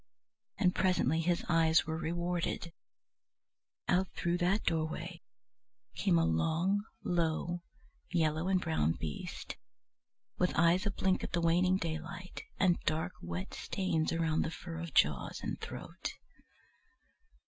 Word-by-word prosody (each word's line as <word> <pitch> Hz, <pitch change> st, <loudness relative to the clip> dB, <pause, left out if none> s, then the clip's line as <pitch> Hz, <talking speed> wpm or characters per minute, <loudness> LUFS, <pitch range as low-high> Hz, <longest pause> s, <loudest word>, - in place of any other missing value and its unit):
And 180 Hz, -3 st, +3 dB
presently 170 Hz, -5 st, +2 dB
his 170 Hz, +1 st, +1 dB
eyes 160 Hz, -2 st, +4 dB
were 160 Hz, -, -2 dB
rewarded: 170 Hz, 0 st, -2 dB, 1.1 s
out 185 Hz, +1 st, +3 dB
through 170 Hz, +1 st, 0 dB
that 185 Hz, +4 st, +2 dB
doorway 160 Hz, -1 st, -2 dB, 0.7 s
came 85 Hz, -, +2 dB
a 80 Hz, -, +4 dB
long, 165 Hz, -, +2 dB, 0.2 s
low, 170 Hz, 0 st, 0 dB, 0.5 s
yellow 160 Hz, -1 st, +1 dB
and 190 Hz, -1 st, +3 dB
brown 160 Hz, -, +1 dB
beast, 75 Hz, -3 st, -6 dB, 0.8 s
with 180 Hz, -, +2 dB
eyes 170 Hz, +5 st, +4 dB
a -, -, +2 dB
blink 190 Hz, -1 st, +1 dB
at -, -, -5 dB
the 170 Hz, -, +2 dB
waning 180 Hz, +3 st, +4 dB
daylight, 170 Hz, +2 st, -5 dB, 0.2 s
and 180 Hz, -3 st, +3 dB
dark 160 Hz, +3 st, 0 dB
wet 85 Hz, +2 st, -5 dB
stains 165 Hz, -5 st, -1 dB
around 165 Hz, -1 st, +1 dB
the -, -, 0 dB
fur 165 Hz, 0 st, -7 dB
of 165 Hz, -3 st, -6 dB
jaws 70 Hz, -3 st, +3 dB
and -, -, -3 dB
throat. -, -, -6 dB
170 Hz, 125 wpm, -33 LUFS, 160-180 Hz, 1.1 s, eyes